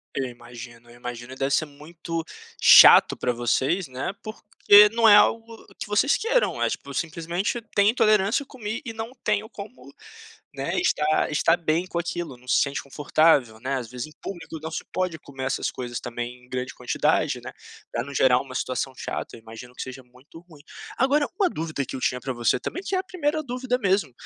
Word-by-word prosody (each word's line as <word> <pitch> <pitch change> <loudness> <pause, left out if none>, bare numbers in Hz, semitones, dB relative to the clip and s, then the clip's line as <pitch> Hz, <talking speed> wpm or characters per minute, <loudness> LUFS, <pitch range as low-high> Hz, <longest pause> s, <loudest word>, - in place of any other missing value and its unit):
Eu 135 - -1
imagino, 120 -1 -11
eu 120 - -15
imagino 120 +1 -8
deve 135 +1 -2
ser 155 - +2
muito 165 +3 -7 0.4
chato - - +8
para - - -1
vocês, 130 +9 0
né, 130 +6 -4
porque 210 -1 +5
não 230 0 +3
é 205 - +9
algo 225 +1 +2
que - - -5
vocês 210 +7 +2
queiram, 475 +2 0
é - - +2
tipo - - -6
simplesmente 170 +7 -2
tem 200 0 +5
intolerância 215 +1 +2
comi 225 -4 -6
e 230 - -4
não 225 +1 -6
tenho 210 0 0
como, 215 +2 -11 0.6
né, - - -3
estar 155 - +1
estar 165 +2 +2
bem 165 +1 -1
com 175 - -4
aquilo, 170 -4 -4
não 125 +1 -21
se - - +3
sente 140 0 -1
confortável, 140 -5 +2
né, 130 +3 -3
às 125 -3 -5
vezes 125 +1 -6
em - - -16
público 165 -4 -7
não 160 +1 -6
se - - -5
pode 185 -3 -2
comer 135 -3 -8
essas 130 - -1
coisas 120 -2 -6
também 120 +1 -6
em - - -23
grande 130 0 -4
quantidade, - - 0
né, - - -9 0.4
para 120 - -1
não 140 +1 -9
gerar 130 -2 +4
uma 130 -2 -9
situação 130 +1 -3
chata - - -6
eu - - -14
imagino 115 +2 -12
que - - -6
seja 130 0 -8
muito 125 +6 -17
ruim. 155 -4 -16 0.4
Agora 285 +3 +2
uma 390 -3 +3
dúvida 160 - -4
que - - -9
eu - - -7
tinha 125 0 -1
para 130 - -4
você 120 0 +1
também 370 - -5
que 390 - -4
é - - +2
a - - -1
primeira 310 -4 -2
dúvida 250 -2 -2
mesmo, 195 - 0
155 Hz, 200 wpm, -24 LUFS, 125-210 Hz, 0.6 s, é